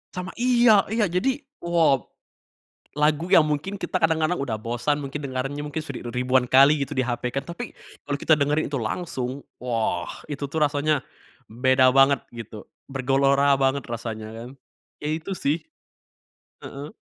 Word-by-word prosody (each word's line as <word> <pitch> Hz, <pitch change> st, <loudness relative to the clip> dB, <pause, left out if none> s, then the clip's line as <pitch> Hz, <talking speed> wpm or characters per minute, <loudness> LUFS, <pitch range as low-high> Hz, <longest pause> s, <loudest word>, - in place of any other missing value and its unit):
Sama, 180 Hz, +1 st, -5 dB
iya 240 Hz, -5 st, +5 dB
iya 220 Hz, -2 st, +2 dB
jadi, 260 Hz, -, 0 dB, 0.2 s
wah! 165 Hz, -6 st, +3 dB, 0.9 s
Lagu 150 Hz, +2 st, +1 dB
yang 170 Hz, -, +9 dB
mungkin 175 Hz, +7 st, -3 dB
kita -, -, -2 dB
kadang-kadang 160 Hz, 0 st, +2 dB
udah 115 Hz, -6 st, -3 dB
bosan 120 Hz, +6 st, -1 dB
mungkin 140 Hz, +1 st, -5 dB
dengernya 135 Hz, +2 st, -3 dB
mungkin 150 Hz, +2 st, -4 dB
sudah 140 Hz, -5 st, -7 dB
ri 120 Hz, +1 st, -3 dB
ribuan 125 Hz, 0 st, +3 dB
kali 140 Hz, +3 st, +5 dB
gitu 145 Hz, -, -11 dB
di 130 Hz, -, 0 dB
HP 125 Hz, -1 st, -2 dB
kan, 135 Hz, -, -1 dB
tapi 170 Hz, -, -7 dB, 0.3 s
kalau 140 Hz, -1 st, -3 dB
kita 155 Hz, -, +4 dB
dengerin 150 Hz, +2 st, +1 dB
itu 140 Hz, -, -3 dB
langsung, 130 Hz, +1 st, -3 dB, 0.2 s
wah! 115 Hz, -8 st, -2 dB, 0.2 s
Itu 145 Hz, -1 st, -4 dB
tuh 155 Hz, +3 st, -3 dB
rasanya 145 Hz, 0 st, 0 dB, 0.5 s
beda 130 Hz, +3 st, +3 dB
banget 135 Hz, +1 st, +5 dB
gitu, 110 Hz, -2 st, -9 dB, 0.2 s
bergelora 135 Hz, +1 st, +3 dB
banget 135 Hz, +1 st, +1 dB
rasanya 110 Hz, -2 st, -5 dB
kan. 120 Hz, +2 st, -8 dB, 0.5 s
Ya 150 Hz, -, -3 dB
itu 165 Hz, +4 st, -6 dB
sih, 155 Hz, +3 st, -1 dB, 1.0 s
heeh. 145 Hz, +3 st, -8 dB
140 Hz, 155 wpm, -24 LUFS, 130-155 Hz, 1.0 s, yang